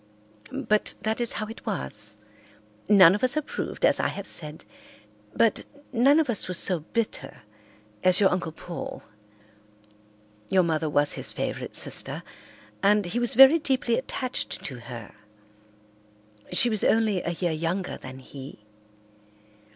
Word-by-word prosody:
But 215 Hz, -3 st, 0 dB
that 220 Hz, +2 st, -1 dB
is 235 Hz, -, +1 dB
how 215 Hz, -, -3 dB
it 225 Hz, +1 st, -11 dB
was. 105 Hz, +10 st, -2 dB, 0.7 s
None 190 Hz, -4 st, +8 dB
of 210 Hz, -, -3 dB
us 255 Hz, +3 st, +1 dB
approved, 305 Hz, -, -2 dB
as -, -, +3 dB
I -, -, +1 dB
have 200 Hz, -, -6 dB
said, 150 Hz, -1 st, -4 dB, 0.7 s
but -, -, +2 dB, 0.3 s
none 270 Hz, +6 st, +4 dB
of 315 Hz, -, +1 dB
us 235 Hz, -5 st, -1 dB
was 180 Hz, -1 st, -3 dB
so 180 Hz, -3 st, 0 dB
bitter 220 Hz, -, -4 dB, 0.6 s
as 185 Hz, 0 st, +5 dB
your 195 Hz, -2 st, +4 dB
Uncle 180 Hz, -3 st, -2 dB
Paul. 170 Hz, +2 st, -8 dB, 1.5 s
Your 185 Hz, -1 st, +3 dB
mother 160 Hz, -2 st, -1 dB
was 145 Hz, 0 st, +2 dB
his -, -, -4 dB
favourite -, -, -4 dB
sister, -, -, +1 dB, 0.6 s
and 205 Hz, 0 st, +3 dB
he 200 Hz, +7 st, -2 dB
was 240 Hz, -2 st, 0 dB
very 270 Hz, +6 st, +8 dB
deeply 260 Hz, -5 st, 0 dB
attached 260 Hz, 0 st, -4 dB
to 130 Hz, -4 st, -6 dB
her. 120 Hz, -2 st, -10 dB, 1.4 s
She 180 Hz, +7 st, +8 dB
was 215 Hz, -3 st, 0 dB
only 215 Hz, -4 st, +2 dB
a 170 Hz, -, -3 dB
year 175 Hz, 0 st, -2 dB
younger 170 Hz, +4 st, -3 dB
than 130 Hz, 0 st, -10 dB
he. 135 Hz, -4 st, -12 dB
190 Hz, 145 wpm, -25 LUFS, 155-230 Hz, 1.5 s, None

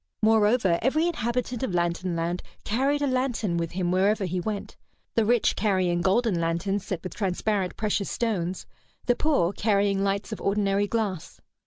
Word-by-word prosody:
Moreover, 215 Hz, -4 st, +4 dB
every 300 Hz, +7 st, +2 dB
inhabitant 245 Hz, -6 st, -2 dB
of 220 Hz, -9 st, -2 dB
Lantern 175 Hz, +1 st, 0 dB
Land 170 Hz, +2 st, -2 dB, 0.2 s
carried 275 Hz, +6 st, +1 dB
a -, -, +2 dB
lantern 255 Hz, -8 st, 0 dB
with 165 Hz, 0 st, -2 dB
him 180 Hz, -1 st, -1 dB
wherever 195 Hz, +2 st, +2 dB
he 180 Hz, 0 st, -2 dB
went, 205 Hz, +2 st, -4 dB, 0.4 s
the 225 Hz, -, +2 dB
rich 240 Hz, +1 st, +2 dB
carrying 185 Hz, -4 st, +1 dB
golden 195 Hz, -1 st, +2 dB
lanterns 180 Hz, +4 st, -1 dB
set 185 Hz, -4 st, -3 dB
with 185 Hz, -, -6 dB
transparent 195 Hz, -1 st, -1 dB
precious 210 Hz, -2 st, -1 dB
stones, 190 Hz, -6 st, -2 dB, 0.4 s
the 245 Hz, -, +3 dB
poor 270 Hz, -, +1 dB
carrying 200 Hz, -1 st, +1 dB
lights 200 Hz, +2 st, -1 dB
of 215 Hz, -, -5 dB
ordinary 200 Hz, 0 st, +1 dB
glass. 205 Hz, -6 st, -3 dB
200 Hz, 160 wpm, -26 LUFS, 180-225 Hz, 0.4 s, Moreover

